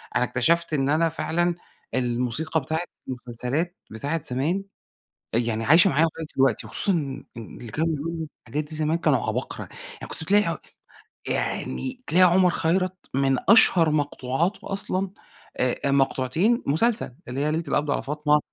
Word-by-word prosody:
أنا - - +3
اكتشفت 165 +7 +1
إن 135 -2 +1
أنا 160 +3 +2
فعلًا 175 +2 -1 0.4
الموسيقى 125 +6 0
بتاعة 160 +4 -2 0.3
المسلسلات 125 +7 -4
بتاعة 145 +9 -3
زمان، 150 +10 -1 0.7
أ - - +4
يعني 115 -1 -1
عايشة 165 - +6
معايا 155 +1 +3
لغاية 160 0 -5
دلوقتي 135 -5 +2
وخصوصًا 200 - +8 0.5
إن 115 - -9
اللي 120 -3 -9
كانوا 160 +4 0
بيقولوا 160 +2 -5
الحاجات 145 +6 -4
دي 155 +1 -9
زمان 155 +1 0
كانوا 150 -6 +1
عباقرة، - - -4 0.4
يعني - - -7
كنت - - -5
تلاقي 205 +5 +1 0.7
يعني 255 -1 -3
تلاقي 180 +1 +5
عمر 185 0 +4
خيرت 185 +3 0 0.2
من 135 -1 +2
أشهر 180 -6 +7
مقطوعاته 145 +5 -2
أصلًا، 195 -1 -1 0.5
آآ، 125 -1 -1
آآ، - - +1
مقطوعتين 140 - +1
مسلسل، 185 - 0
اللي 125 +2 -4
هي 150 +1 0
ليلة 160 +2 -1
القبض 145 0 0
على - - 0
فاطمة، 150 +1 +1
155 Hz, 150 wpm, -24 LUFS, 130-170 Hz, 0.7 s, وخصوصًا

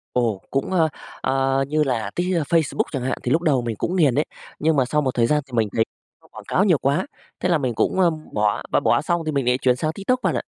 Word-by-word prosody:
Ồ, 115 -6 +1
cũng, 135 +5 -1
ờ, 165 -4 +3 0.3
ờ, 135 0 +1
như 155 +1 +2
là 115 -6 -1
Tik 180 +1 0
ơ, 165 - +1
Facebook 160 +1 +1
chẳng 135 - -2
hạn, 130 0 -2
thì 125 - -1
lúc 165 +3 +2
đầu 140 -7 +2
mình 115 -2 -3
cũng 180 - -2
nghiền 145 -8 +4
đấy. 150 - +2 0.3
Nhưng 160 0 +2
mà 130 - +4
sau 150 +4 0
một 130 - +1
thời 115 -1 +3
gian 150 +3 +1
thì 130 - -20
mình 110 -3 +1
thấy 110 - +4 0.4
nó - - -22
quảng - - -10
cáo 190 - +2
nhiều 175 -8 +4
quá, 145 - 0 0.3
thế - - 0
là 170 -3 +3
mình 125 -4 -1
cũng, 190 - +1
ơ, 175 -2 +5 0.2
bỏ, 105 -1 +1
mà - - +3
bỏ - - +2
xong 170 0 0
thì 155 - -1
mình 140 -3 -1
lại 125 +1 +3
chuyển 125 -2 +2
sang 155 +5 -1
TikTok 250 +8 -1
bạn - - +1
ạ. - - -1
140 Hz, 280 wpm, -22 LUFS, 125-165 Hz, 0.4 s, ơ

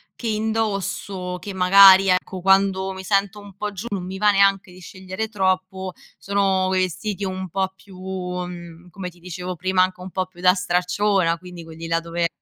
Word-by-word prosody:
che 235 - -6
indosso 200 -4 -2
che 205 - -7
magari, 190 +1 +7
ecco, 185 0 0
quando 195 0 +3
mi 190 - -8
sento 200 +1 0
un 200 -2 -13
po' 210 +1 -4
giù 200 +3 -7
non 195 -4 -4
mi 190 +1 -6
va 210 +1 +4
neanche 195 -2 +3
di 180 - -14
scegliere 190 +4 -6
troppo. 190 -2 -1 0.3
Sono 195 -2 +1
vestiti 190 +2 -1
un 185 -1 -4
po' 190 +2 -2
più 190 -1 -16
mhmm, 180 -2 -6
come 180 +1 -6
ti 175 0 -20
dicevo 180 +1 -6
prima, 185 +2 +1
anche 185 0 0
un 185 - -8
po' 185 +1 -2
più 180 -1 -16
da 180 0 +6
stracciona, 180 -1 +1
quindi 180 -1 -10
quelli 165 0 -9
là 165 0 +1
dove 170 0 -1
185 Hz, 185 wpm, -22 LUFS, 180-195 Hz, 0.3 s, magari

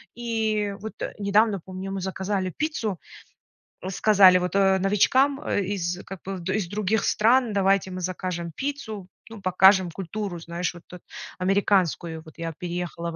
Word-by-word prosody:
И 220 -3 -1
вот 220 +1 -6 0.3
недавно, 205 0 +2
помню, 190 +1 -6
мы 195 - -3
заказали 190 0 -2
пиццу, 225 - -2 0.8
м, 185 - -5
сказали, 190 -2 +6
вот, 180 +2 -3
э, 195 -1 +4
новичкам, 260 +9 +3
э, 205 - -1
из, 180 -2 -3
как 195 -2 -9
бы, 195 0 -4
в - - -8
из 200 -2 -1
других 210 +2 0
стран: 235 +1 +3
"Давайте 195 -1 +2
мы 185 0 -5
закажем 180 -1 -4
пиццу, 265 -9 -5 0.2
ну, 225 -2 -10
покажем 190 0 +5
культуру, 195 +1 -5
знаешь, 170 +1 -3
вот 175 -1 -13
эт 180 -1 -10 0.4
американскую". 185 -4 +1
Вот 160 - -15
я 165 -1 -4
переехала 175 -1 -4
в - - -8
195 Hz, 160 wpm, -25 LUFS, 180-210 Hz, 0.8 s, сказали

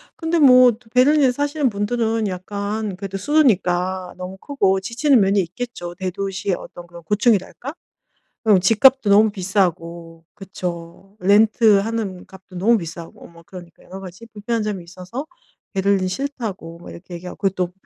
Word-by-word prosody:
근데 330 0 -1
뭐 255 -3 +7
또 225 0 -14
베를린에 265 +1 +4
사시는 285 +1 -1
분들은 220 +1 -1
약간 200 +2 -4
그래도 195 0 -5
수도니까 185 - +1
너무 185 +1 -7
크고 195 -6 0
지치는 240 +6 +2
면이 195 +1 +2
있겠죠. 180 -1 -6
대도시의 195 +1 -3
어떤 175 - -11
그런 170 -1 -13
고충이랄까? 210 - 0 0.7
그럼 210 -4 +4
집값도 230 +5 +4
너무 210 +2 +5
비싸고. 170 -4 -2
그쵸. 185 -1 -8
렌트하는 210 -1 +2
값도 190 -1 -15
너무 220 +6 +3
비싸고 165 -1 -9
뭐 170 0 -17
그러니까 175 -3 -13
여러 190 +1 -10
가지 190 +4 -11
불편한 225 +1 -3
점이 205 -4 -4
있어서 185 - -8 0.5
"베를린 195 -1 +1
싫다."고 210 -9 -5
뭐 175 - -12
이렇게 175 +1 -11
얘기 175 +1 -9
하고 - - -8
그리고 195 -2 0
또 180 -1 -2
195 Hz, 355 characters per minute, -20 LUFS, 180-230 Hz, 0.7 s, 뭐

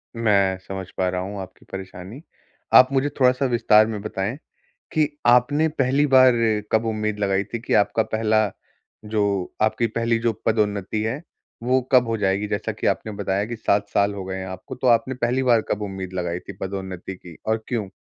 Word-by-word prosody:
मैं 100 -4 +2
समझ 95 -1 -5
पा 95 - +1
रहा 90 0 -2
हूँ, 100 +2 -5
आपकी 95 -1 -12
परेशानी। 95 +5 -8 0.5
आप 130 +1 +8
मुझे 135 +2 +2
थोड़ा-सा 130 +1 +3
विस्तार 115 -3 +4
में 110 -2 -4
बताएँ, 105 +3 -3 0.6
कि 155 -2 +2 0.2
आपने 125 +6 +4
पहली 140 -1 +1
बार 130 -1 +8 0.4
कब 110 +1 +3
उम्मीद 110 -1 -2
लगाई 100 -1 +1
थी 115 - -2
कि - - -2
आपका 105 +2 +3
पहला 110 -1 +1 0.5
जो 100 -3 -1
आपकी 110 +2 +2
पहली 115 +1 0
जो 115 0 +1
पदोन्नति 105 -1 0
है, 115 +8 -3 0.4
वो 130 +2 +2
कब 125 -1 +6
हो 115 - 0
जाएगी, 100 0 0
जैसा - - -2
कि - - -4
आपने 110 - -1
बताया 100 -1 -1
कि 120 +1 -5
7 105 -2 0
साल 100 0 +1
हो 100 -2 -6
गए 95 0 -5
हैं 95 - -5
आपको, 95 0 -8
तो 130 - -3
आपने 125 +2 +3
पहली 125 +1 0
बार 120 -3 +4
कब 105 - -1
उम्मीद 95 -2 -5
लगाई 90 -1 -2
थी, - - -9
पदोन्नति 95 -1 -5
की 85 -3 -13
और 110 0 0
क्यों? 110 -6 -2
110 Hz, 190 wpm, -23 LUFS, 95-120 Hz, 0.6 s, आप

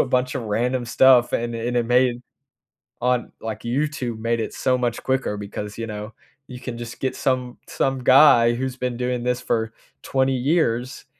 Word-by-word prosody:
a - - +3
bunch 125 +1 0
of 130 - -4
random 120 +4 -1
stuff 125 0 +5
and 120 0 -1
it 115 +1 -3
and 125 - -2
it 120 - +1
made 125 0 +2 0.8
on, 125 0 0
like, 110 -1 -5
YouTube 125 -2 -2
made 115 +1 0
it 110 - -4
so 130 -1 +1
much 120 -2 -2
quicker 130 -6 -1
because, 105 0 -6
you 115 - -3
know, 105 +1 -7 0.3
you 125 -1 -9
can 125 -2 -6
just 120 0 -8
get 130 - -2
some 125 -2 -1
some 135 -2 -1
guy 120 -3 +6
who's 130 +1 -3
been 125 -2 -3
doing 125 0 -2
this 125 0 0
for 115 -1 -1 0.3
20 135 0 +1
years, 130 -3 0
125 Hz, 190 wpm, -22 LUFS, 115-130 Hz, 0.8 s, guy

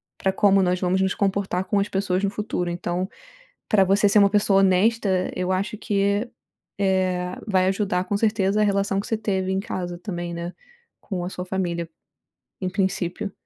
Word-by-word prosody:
pra 190 - 0
como 195 0 +4
nós 180 0 +1
vamos 185 +1 +1
nos 190 0 +1
comportar 195 -2 0
com 205 - +1
as 200 - -1
pessoas 195 0 0
no 200 - +2
futuro. 200 -4 -3
Então, 175 +2 -2 0.6
pra 200 -3 +5
você 200 +2 +3
ser 210 - +3
uma 200 -1 +6
pessoa 205 -2 +3
honesta, 190 0 +2
eu 180 +1 -1
acho 195 +3 -1
que, 205 +1 0 0.5
eh, 185 -2 0
vai 185 -2 +2
ajudar, 190 -2 0
com 205 - -1
certeza, 210 -2 +1
a - - +5
relação 200 -1 +1
que 200 - -4
você 225 - 0
teve 190 -3 -1
em 190 - 0
casa 180 -5 -4
também, 175 -2 -5
né, 170 +1 -5 0.5
com 180 -4 -4
a 180 - -3
sua 180 -1 -6
família, 175 -3 -2 0.7
em 185 - -1
princípio. 190 0 -2
190 Hz, 185 wpm, -24 LUFS, 180-200 Hz, 0.7 s, uma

